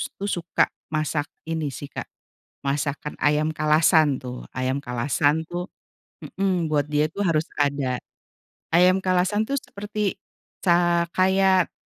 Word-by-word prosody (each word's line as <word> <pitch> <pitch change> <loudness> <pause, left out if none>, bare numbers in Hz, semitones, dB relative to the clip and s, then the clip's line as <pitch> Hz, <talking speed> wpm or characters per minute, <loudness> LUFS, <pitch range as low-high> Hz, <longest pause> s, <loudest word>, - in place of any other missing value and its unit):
tuh 200 +1 -4
suka 175 -3 +1 0.3
masak 155 -1 -1 0.2
ini 160 -2 -2
sih, 140 +1 -8
Kak, - - -6 0.6
masakan 145 +1 -2
ayam 150 +1 +2
Kalasan 155 -2 +4
tuh, 125 -1 -7
ayam 130 +1 -1
Kalasan 130 +4 +1
tuh 175 +1 -4 0.6
mhm, 185 -4 -1
buat 150 -2 +2
dia 150 0 +1
tuh 200 +6 -3
harus 165 -4 +2
ada. 140 -3 0 0.8
Ayam 185 +2 +5
Kalasan 185 +3 +2
tuh 280 - 0
seperti 205 -2 -4 0.4
ca 175 -1 +3
kayak, 190 -1 +3
160 Hz, 125 wpm, -24 LUFS, 145-185 Hz, 0.8 s, Ayam